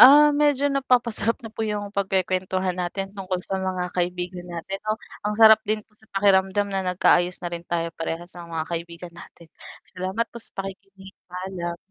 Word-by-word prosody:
ah, 295 +3 +10
medyo 290 -1 +3
napapasarap 245 -4 +2
na 225 - -7
po 225 - -7
yung 210 -2 -2
pagkek'wentuhan 185 -1 0
natin 195 +2 -3
tungkol 190 -2 -3
sa 190 0 -2
mga 185 -1 -2
kaibigan 180 0 -2
natin 175 +3 -5
'no? 215 0 -1 0.3
Ang 210 - -1
sarap 220 -1 +8
din 215 0 0
sa 220 +1 -25
pakiramdam 195 0 +3
na 195 - +1
nag 180 -1 -2
kaayos 180 0 +4
na 175 - -3
rin 170 - -3
tayo 170 -1 -1
parehas 165 +2 -5
sa 175 -1 -10
mga 165 -1 -2
kaibigan 170 +1 -5
natin. 170 -1 -14 0.4
Salamat 190 +5 -1
po - - -10
sa - - -11
pakikinig. 195 0 -8 0.2
Paalam. 180 -1 -4
190 Hz, 175 wpm, -24 LUFS, 175-210 Hz, 0.4 s, ah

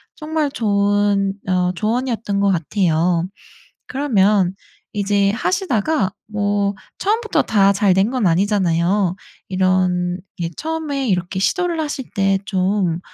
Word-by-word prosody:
정말 310 -1 -1
좋은 205 -3 +1
어 180 -1 +1
조언이었던 220 -1 -1
거 200 0 +3
같아요. 170 -1 +1 0.6
그러면 210 -8 +2 0.4
이제 200 0 +2
하시다가 265 - 0 0.2
뭐 205 -1 0 0.2
처음부터 445 +3 +1
다 200 -2 +3
잘 200 -1 +3
된 190 +5 +2
건 255 -6 0
아니잖아요. 185 0 +2 0.3
이런 185 -1 +1 0.2
이게 170 -1 -2
처음에 310 -4 -3
이렇게 180 0 -1
시도를 350 - 0
하실 290 -5 -3
때 195 -1 +2
좀 185 -3 0
200 Hz, 245 characters per minute, -19 LUFS, 185-240 Hz, 0.6 s, 거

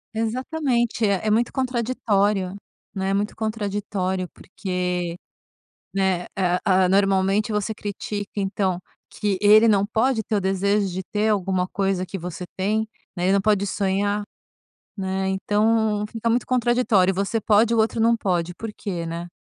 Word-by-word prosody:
Exatamente. 240 0 0
É 200 -1 0
é 215 - +2
muito 235 +2 +2
contraditório, 210 -7 0 0.4
né? 190 0 -1
Muito 205 +1 -1
contraditório 200 -4 -2
porque, 180 -2 -3 0.8
né, 190 -2 +1
eh, 180 -1 +1
ah, 185 -2 +4
normalmente 195 +2 +2
você 210 +1 -1
critica, 205 0 -5
então, 195 -2 0 0.3
que 205 -3 -1
ele 215 +2 +7
não 200 -2 +3
pode 225 +1 +1
ter 215 - -2
o 200 - +1
desejo 195 +1 +1
de 185 +1 -4
ter 210 +4 0
alguma 190 -2 0
coisa 195 -2 0
que 195 - -6
você 180 +1 -6
tem, 215 +3 +1 0.3
né? 175 - -3
Ele 190 - +3
não 200 - +4
pode 205 -1 +2
sonhar, 200 +1 0 0.7
né? 190 -1 -2
Então 210 +2 +1
fica 225 +1 -3
muito 235 +2 +2
contraditório, 240 -6 +2
você 200 +4 -1
pode, 220 +3 +3
o - - +1
outro 220 +1 +1
não 230 +1 +4
pode, 175 -5 -1
por 225 +2 -6
quê, 175 -5 -4
né? 170 +1 -5
200 Hz, 150 wpm, -23 LUFS, 190-220 Hz, 0.8 s, ele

